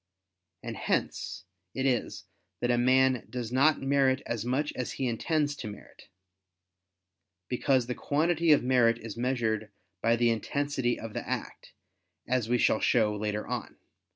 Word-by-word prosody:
And - - -5
hence 95 0 -2 0.3
it 130 - -1
is 115 -6 -1 0.3
that 120 - +1
a 120 - +2
man 130 0 +3
does 120 -2 -5
not 140 +5 +4
merit 135 -1 +2
as 115 -3 -3
much 135 +5 -1
as 125 - -4
he 130 - -2
intends 145 +5 0
to 110 - -6
merit: 105 -1 -12 1.4
because 130 0 +1
the 125 - -3
quantity 160 +5 +1
of 145 - +5
merit 120 -2 +3
is 115 -3 -8
measured 115 -3 -1 0.3
by 115 +1 +3
the 120 0 +3
intensity 130 +2 -1
of 115 -1 -7
the - - -5
act, - - -5 0.5
as 120 -3 0
we 125 - +3
shall 110 - +3
show 110 -3 +2
later 105 0 -2
on - - -4
(Q. - - -37
125 Hz, 155 wpm, -29 LUFS, 115-135 Hz, 1.4 s, of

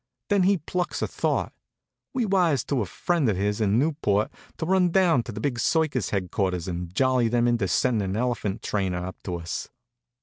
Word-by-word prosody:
Then 200 -2 +3
he 195 +2 +4
plucks 175 +3 -3
a - - 0
thought. - - -1 0.6
We 250 -3 0
wires 175 - +2
to 140 -4 -1
a 100 - -2
friend 165 - 0
of 100 - 0
his 105 +2 0
in 105 0 +3
Newport 125 -8 +1 0.3
to - - -3
run 185 0 +3
down 170 -7 +4
to - - -7
the 105 - -6
big 120 0 -1
circus 145 - +1
headquarters 95 -2 -1
and 90 -1 -4
jolly 130 -3 +3
them 120 +1 +2
into 120 -5 +1
sending 100 +2 +1
an 95 - -2
elephant 115 -5 -1
trainer 95 -4 -1
up 95 - -8
to 90 - -2
us. 85 -3 -5
120 Hz, 195 wpm, -25 LUFS, 100-160 Hz, 0.6 s, he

